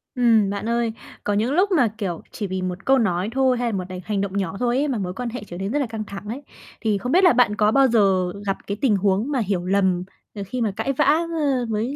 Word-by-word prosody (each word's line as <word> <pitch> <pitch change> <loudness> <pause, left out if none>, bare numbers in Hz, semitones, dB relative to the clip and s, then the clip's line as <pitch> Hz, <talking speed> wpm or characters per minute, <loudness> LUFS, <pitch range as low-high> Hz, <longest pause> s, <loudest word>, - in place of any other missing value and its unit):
Ừm, 230 -5 +4
bạn 200 +3 -3
ơi, 235 -1 0 0.3
có 205 - 0
những 220 +6 +1
lúc 380 +5 +2
mà, 295 -10 +4
kiểu, 180 -6 -3
chỉ 205 - -4
vì 190 0 -3
một 185 +1 -4
câu 270 0 +5
nói 190 -4 0
thôi 260 0 +2
hay 245 0 -1
là 200 - -2
một 185 - -3
đành 185 0 -6
hành 205 -2 -1
động 200 0 -3
nhỏ 190 -2 -2
thôi 245 0 +1
ấy 290 +2 +1
mà 260 -5 -1
mối 180 -2 -3
quan 245 +3 -4
hệ 240 0 -6
trở 175 - -8
nên 195 +3 -3
rất 295 - 0
là 280 - +1
căng 220 -1 -5
thẳng 200 0 -9
ấy. 240 +6 -5 0.4
Thì 215 -3 +1
không 250 +6 -4
biết 370 +3 +4
là 360 - +7
bạn 235 -4 +3
có 210 +1 +3
bao 270 +1 +5
giờ 195 -6 +2
gặp 195 - -1
cái 200 - -3
tình 245 -7 +3
huống 200 +6 +1
mà 270 - +1
hiểu 195 -5 -1
lầm, 185 -2 +1 0.3
ờ, 200 - -4
khi 250 +4 -3
mà 220 - +1
cãi 275 - -1
vã, - - +2
ơ, 300 -4 +1
với 225 +5 -2
220 Hz, 280 wpm, -22 LUFS, 195-255 Hz, 0.4 s, là